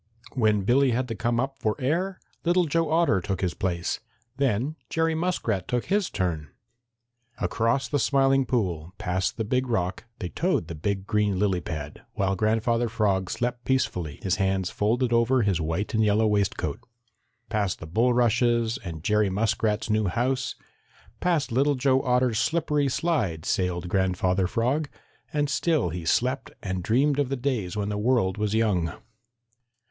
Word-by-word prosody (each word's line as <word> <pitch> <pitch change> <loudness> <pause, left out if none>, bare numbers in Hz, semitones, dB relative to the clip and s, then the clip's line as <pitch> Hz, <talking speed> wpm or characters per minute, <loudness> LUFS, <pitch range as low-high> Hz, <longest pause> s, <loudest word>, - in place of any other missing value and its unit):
When 105 -5 +2
Billy 130 +6 +4
had 125 +1 0
to 115 - -3
come 120 +2 0
up 135 +2 -2
for 110 -1 0
air, 175 +8 -1 0.2
Little 175 +1 +3
Joe 165 +1 0
Otter 160 - +3
took 95 +1 -3
his 90 -3 0
place. 90 -3 -2 0.4
Then 135 +2 0
Jerry 165 0 +1
Muskrat 160 - -1
took 125 -1 -1
his 200 -1 +1
turn. 80 -5 -2 0.9
Across 115 +4 0
the 145 - +1
Smiling 135 0 +3
Pool, 90 -9 -1
past 90 +1 -1
the 110 - -1
Big 125 +4 0
Rock, 95 -4 -1
they 90 -4 -4
towed 80 +1 0
the - - -4
big 95 +5 -2
green 105 -2 +1
lily 95 -2 +1
pad, 75 -3 -6
while 95 0 +1
Grandfather 115 +3 +1
Frog 100 -5 0
slept 120 0 -2
peacefully, 90 - -1
his 90 -2 +1
hands 95 -1 0
folded 120 +4 +1
over 115 +2 +3
his 95 -5 +1
white 80 +6 -2
and 110 0 +3
yellow 105 +1 +3
waistcoat. 105 -2 0 0.7
Past 105 -4 0
the - - -9
bulrushes 120 +3 +2
and 80 -4 -7
Jerry 105 0 +2
Muskrat's 105 +2 0
new 110 -1 +2
house, 125 +7 -1 0.6
past 165 -7 +1
Little 140 +4 +2
Joe 130 0 +2
Otter's 125 -3 +2
slippery 150 -3 +1
slide 120 - -1
sailed 90 -1 -1
Grandfather 95 0 +1
Frog, 130 +9 0 0.4
and 145 -1 +1
still 145 - +1
he 85 0 -5
slept 130 +9 +1
and 95 -2 -2
dreamed 135 +9 +2
of 140 -3 +1
the 135 - 0
days 120 -8 -2
when 100 0 -1
the 105 0 -2
world 105 -4 +1
was 105 0 0
young. 95 -8 +1
110 Hz, 160 wpm, -26 LUFS, 95-130 Hz, 0.9 s, Billy